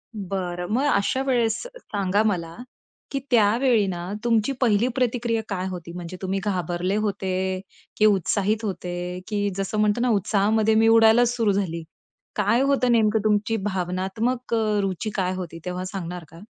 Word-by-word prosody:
बरं. 180 -3 -4
मग 260 +5 +2
अशा 200 +6 +1
वेळेस 235 -5 +1 0.2
सांगा 200 - -1
मला 170 -6 -1 0.6
की 275 - -1
त्यावेळी 230 0 +4
ना, 175 0 -4
तुमची 230 +1 +2
पहिली 230 -1 +3
प्रतिक्रिया 240 -2 0
काय 185 -1 -2
होती? 175 -2 -7
म्हणजे 180 +1 -7
तुम्ही 190 +1 -1
घाबरले 180 -1 -1
होते, 190 -2 -1 0.4
की 215 - +4
उत्साहित 205 +2 +2
होते, 180 -2 -4
की 205 -1 0
जसं 195 +2 -2
म्हणतो 210 +2 +2
ना, 250 - +2
उत्साहामध्ये 215 +1 +2
मी 225 +1 +4
उडायलाच 225 +1 +6
सुरू 225 -4 +2
झाली. 180 -4 -2 0.5
काय 210 +4 +2
होतं 275 -3 +2
नेमकं 220 -2 +3
तुमची 215 +1 +1
भावनात्मक 195 +6 -2
अ, 215 -2 +1
रुची 195 +2 -2
काय 185 -2 0
होती 170 -3 -6
तेव्हा, 180 0 -3
सांगणार 180 -2 -5
का? 165 - -14
205 Hz, 150 wpm, -24 LUFS, 185-225 Hz, 0.6 s, उडायलाच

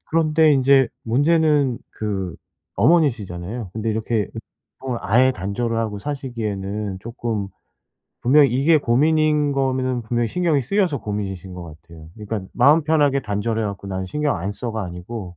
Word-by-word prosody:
그런데 160 -1 +3
인제 135 -1 +4 0.2
문제는 145 +1 +2
그 95 -5 -4 0.4
어머니시잖아요. 110 - +1
근데 110 +1 -2
이렇게 110 -1 -1 0.5
보통은 130 -3 -4
아예 125 +7 +4
단절을 115 +3 -3
하고 110 -3 -2
사시기에는 105 -7 -4
쪼끔 115 -3 -4 0.7
분명히 140 +3 +5
이게 140 +6 +4
고민인 150 +3 +2
거는 130 -2 0
분명히 120 +1 -1
신경이 165 -2 +1
쓰여서 175 - 0
고민이신 95 -3 -5
것 90 -1 -7
같아요. 80 0 -13
그러니까 105 -1 -5
'마음 145 +6 +5
편하게 145 -3 +2
단절해 110 +2 -1
갖고 100 -1 -5
난 95 -1 -3
신경 150 +7 -1
안 95 +5 -3
써.'가 110 0 -4
아니고 90 +1 -7
120 Hz, 345 characters per minute, -21 LUFS, 100-140 Hz, 0.7 s, 분명히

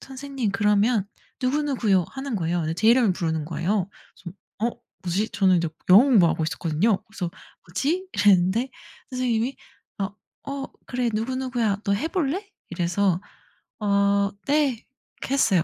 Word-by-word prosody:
선생님 270 -4 -4
그러면 210 +1 +2 0.4
누구누구요." 255 - +2
하는 270 -4 -4
거예요. 175 0 0
근데 160 0 -2
제 220 +6 0
이름을 235 -5 +5
부르는 160 -3 -2
거예요. 175 +4 -1 0.3
그래서 180 +2 -10 0.4
어 - - -31 0.3
'뭐지?' 190 +5 0
저는 190 -2 +4
인제 170 -1 +1 0.2
영어 200 +6 +10
공부하고 180 - +4
있었거든요. 165 +6 0
그래서 205 -6 -5 0.4
'뭐지?' 305 - -1
이랬는데 205 +5 +3 0.4
선생님이 250 0 0 0.4
어 195 0 -1 0.4
"어 275 -1 -4 0.2
그래 245 -1 -1
누구누구야 240 -3 -1
너 200 - +1
해 300 +11 -1
볼래?" 365 +4 -1 0.2
이래서 175 +1 +1 0.6
"어, 200 -1 +2 0.2
네." 280 -5 +2 0.4
그렇게 270 - -3
했어요. 195 - +3
210 Hz, 330 characters per minute, -24 LUFS, 185-255 Hz, 0.6 s, 영어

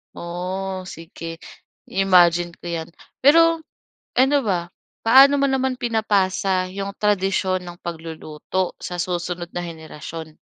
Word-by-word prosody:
Oh, 185 +2 -4
sige, 165 0 -8 0.5
i-imagine 175 -3 +4
ko - - -16
'yan. 170 -1 -4 0.3
Pero, 330 +3 +5 0.6
ano 270 +3 +5
ba, 175 -4 0 0.4
paano 275 +4 +7
mo - - +4
naman 265 -1 0
pinapasa 195 -5 +1
'yong 200 +1 -5
tradisyon 195 -2 +1
ng 175 0 -9
pagluluto 165 +2 -4
sa 180 - -5
susunod 175 -1 -3
na 175 - -2
henerasyon? 160 -1 -8
185 Hz, 115 wpm, -22 LUFS, 170-210 Hz, 0.6 s, paano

